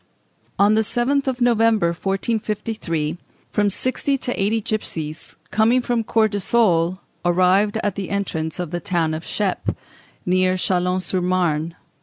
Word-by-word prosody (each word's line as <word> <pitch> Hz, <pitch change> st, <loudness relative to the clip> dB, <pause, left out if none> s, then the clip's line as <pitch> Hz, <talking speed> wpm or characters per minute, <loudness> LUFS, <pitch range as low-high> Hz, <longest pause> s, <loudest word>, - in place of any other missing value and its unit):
On 205 Hz, +1 st, +5 dB
the 220 Hz, -, +4 dB
7th 255 Hz, +5 st, +1 dB
of 255 Hz, -1 st, -2 dB
November, 225 Hz, -6 st, +3 dB
1453, 195 Hz, -3 st, -2 dB, 0.3 s
from 205 Hz, -1 st, +2 dB
sixty 260 Hz, +6 st, -1 dB
to 250 Hz, -1 st, -2 dB
eighty 215 Hz, +3 st, +2 dB
gipsies, 160 Hz, -8 st, -4 dB, 0.2 s
coming 220 Hz, +5 st, +3 dB
from 240 Hz, -2 st, 0 dB
Courtisolles, 205 Hz, -5 st, +2 dB, 0.3 s
arrived 185 Hz, +4 st, +3 dB
at 205 Hz, -, 0 dB
the 195 Hz, -1 st, -5 dB
entrance 160 Hz, -6 st, -2 dB
of 175 Hz, -3 st, -4 dB
the 175 Hz, -, -2 dB
town 170 Hz, -5 st, 0 dB
of 160 Hz, +1 st, -4 dB
Cheppe, 200 Hz, -3 st, -2 dB, 0.5 s
near 185 Hz, 0 st, +2 dB
Châlons 180 Hz, 0 st, 0 dB
sur 185 Hz, -1 st, -1 dB
Marne. 170 Hz, -3 st, 0 dB
195 Hz, 135 wpm, -21 LUFS, 175-220 Hz, 0.5 s, On